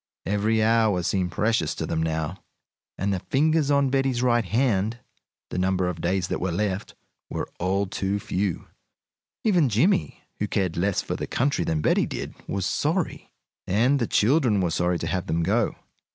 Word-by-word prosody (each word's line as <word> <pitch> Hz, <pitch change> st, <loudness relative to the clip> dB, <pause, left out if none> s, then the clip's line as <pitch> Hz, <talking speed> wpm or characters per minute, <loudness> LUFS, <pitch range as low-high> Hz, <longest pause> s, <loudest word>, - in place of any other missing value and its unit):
Every 105 Hz, +3 st, +1 dB
hour 110 Hz, -5 st, +3 dB
seemed 90 Hz, 0 st, 0 dB
precious 105 Hz, -6 st, 0 dB
to -, -, -3 dB
them 80 Hz, -1 st, -1 dB
now, 80 Hz, +2 st, -2 dB, 0.5 s
and 100 Hz, +1 st, 0 dB
the 95 Hz, -, -1 dB
fingers 155 Hz, -, +1 dB
on 140 Hz, -2 st, +3 dB
Betty's 135 Hz, -2 st, +1 dB
right 120 Hz, -2 st, +3 dB
hand 110 Hz, 0 st, +1 dB, 0.5 s
the -, -, -2 dB
number 95 Hz, 0 st, +1 dB
of 85 Hz, -2 st, -4 dB
days 90 Hz, +1 st, 0 dB
that -, -, -2 dB
were 95 Hz, 0 st, 0 dB
left 100 Hz, +2 st, -2 dB, 0.3 s
were -, -, -3 dB
all 95 Hz, +3 st, +1 dB
too 95 Hz, +1 st, -2 dB
few. 95 Hz, -2 st, -2 dB, 0.8 s
Even 180 Hz, -, +3 dB
Jimmie, 170 Hz, -, +1 dB, 0.2 s
who 105 Hz, -, 0 dB
cared 95 Hz, -4 st, -1 dB
less 95 Hz, +3 st, 0 dB
for -, -, -3 dB
the -, -, -4 dB
country 140 Hz, +3 st, 0 dB
than 80 Hz, -1 st, -1 dB
Betty -, -, +2 dB
did, -, -, -5 dB
was 100 Hz, -2 st, -2 dB
sorry. 160 Hz, -, -1 dB, 0.4 s
And 125 Hz, +9 st, +3 dB
the 115 Hz, -, 0 dB
children 120 Hz, -2 st, +3 dB
were 90 Hz, -3 st, 0 dB
sorry 90 Hz, +1 st, +1 dB
to 85 Hz, -, -4 dB
have 90 Hz, +3 st, -2 dB
them 85 Hz, +1 st, 0 dB
go. 105 Hz, +6 st, +1 dB
100 Hz, 175 wpm, -25 LUFS, 90-120 Hz, 0.8 s, hour